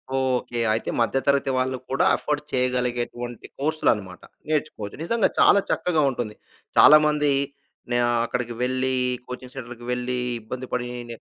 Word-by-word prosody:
Okay. 125 -2 0
అయితే 110 - -2
మధ్య 115 +3 +2
తరగతి 140 -1 +3
వాళ్ళు 130 0 0
కూడా 135 - +2
ఎఫర్డ్ 150 -1 -2
చేయగలిగేటువంటి 120 -1 -2
కోర్సులనమాట. 110 -11 0 0.3
నేర్చుకోవచ్చు. 145 -9 -2
నిజంగా 225 +4 +2
చాలా 200 - +6
చక్కగా 170 -4 +1
ఉంటుంది. 120 -4 -4 0.4
చాలామంది 150 -1 +6 0.6
నా - - +3 0.3
అక్కడికి 120 0 -3
వెళ్ళి, 130 +1 0 0.3
కోచింగ్ 125 0 -8
సెంటర్‌కి 120 -2 -8
వెళ్ళి, 125 0 -2 0.2
ఇబ్బంది 125 +4 -6
పడి, 125 -1 -1 0.2
నే 115 - -6
125 Hz, 130 wpm, -24 LUFS, 120-140 Hz, 0.6 s, చాలా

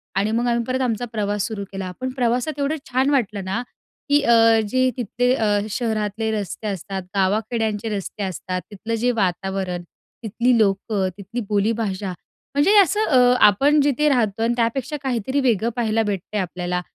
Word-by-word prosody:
आणि 205 +3 +1
मग 235 +2 0
आम्ही 235 -1 +1
परत 260 +1 -1
आमचा 240 -1 -1
प्रवास 205 -2 -1
सुरू 215 -3 -5
केला. 190 -1 -5
पण 260 - -1
प्रवासात 255 +3 -1
एवढं 280 +2 0 0.2
छान 260 +3 +2
वाटलं 215 -8 0
ना, 195 +5 -2 0.5
की 290 0 +4
अ, 230 -2 +5
जे 255 +2 +2
तिथले 245 +2 0
अ, 210 -4 +1
शहरातले 220 -1 -1
रस्ते 210 0 -4
असतात, 195 0 -4
गावाखेड्यांचे 215 +2 0
रस्ते 200 +1 -5
असतात, 185 0 -4
तिथलं 220 +3 -4
जे 245 - +3
वातावरण, 190 -3 -2 0.4
तिथली 235 +3 +2
लोकं, 200 -1 +1
तिथली 200 +5 -5
बोलीभाषा. 205 -2 -1 0.4
म्हणजे 320 +9 +4
असं 405 +2 +4
अ, 260 - +4 0.3
आपण 280 +9 +3
जिथे 290 +1 +2
राहतो 225 -4 +1
आणि 235 - +2
त्यापेक्षा 255 +5 -1
काहीतरी 260 +1 -1
वेगळं 235 -4 +2
पाहायला 225 -2 +1
भेटते 205 0 -3
आपल्याला 180 -1 -2
225 Hz, 160 wpm, -22 LUFS, 200-245 Hz, 0.5 s, अ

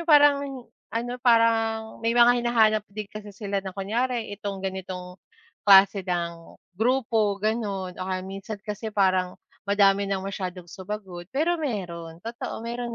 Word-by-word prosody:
yung 340 - -8
parang 285 -3 +4 0.2
ano, 235 +2 -3
parang 225 -2 +2
may 230 +1 0
mga 240 0 +7
hinahanap 220 -3 +3
din 210 +2 -6
kasi 210 -1 -8
sila 200 0 -3
na 190 -1 -8
kunyari 230 +3 -1
itong 200 -1 -5
ganitong 185 -1 -6 0.5
klase 195 0 +8
ng 170 -2 -4 0.2
grupo, 225 -4 +2
gano'n 205 -4 -1
o 185 - -3
kaya 185 -1 -2
minsan 195 +3 -6
kasi 210 +1 -4
parang 185 -2 +2 0.3
madami 200 0 +4
ng 195 -1 -1
masyadong 185 -3 -5
sumagot, 190 -2 -7
pero 335 +5 +1
meron, 170 - -4
totoo 230 -1 -5
meron 240 0 -4
205 Hz, 145 wpm, -26 LUFS, 190-230 Hz, 0.5 s, klase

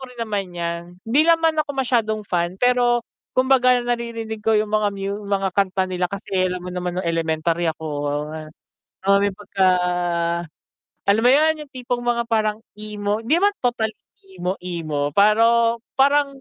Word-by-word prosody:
rin 250 - -16
naman 205 -4 -2
'yan. 170 0 -2 0.2
Hindi 235 +6 +3
ako 325 -3 +3
masyadong 230 -5 0
fan 175 -1 -1
pero 245 +1 +2 0.3
kumbaga 255 -1 +4
naririnig 235 -2 -3
ko 220 +1 +2
'yung 210 0 -1
mga 215 -1 +2
mu 200 +1 -4
mga 195 -1 0
kanta 190 -1 +1
nila 180 -1 -2
kasi 190 -1 -1
alam 180 0 -4
mo 180 - -6
naman 180 0 -3
nung 185 - -2
elementary 165 0 0
ako, 160 0 -4 1.2
ah, 200 +1 +4
may 200 -1 0
pagka 195 -1 0 1.4
alam 200 +2 +4
mo - - +6
'yun 310 +2 +3
'yung 280 - -25
tipong 245 -1 -3
mga 235 -1 0
parang 215 -1 0 0.2
emo 210 0 -3
'di 245 - -2
naman 405 +1 +2
total 235 -3 +1 0.4
emo-emo 175 -5 -3
pero 230 +3 +4 0.2
parang, 280 +1 +3
215 Hz, 150 wpm, -22 LUFS, 185-240 Hz, 1.4 s, mo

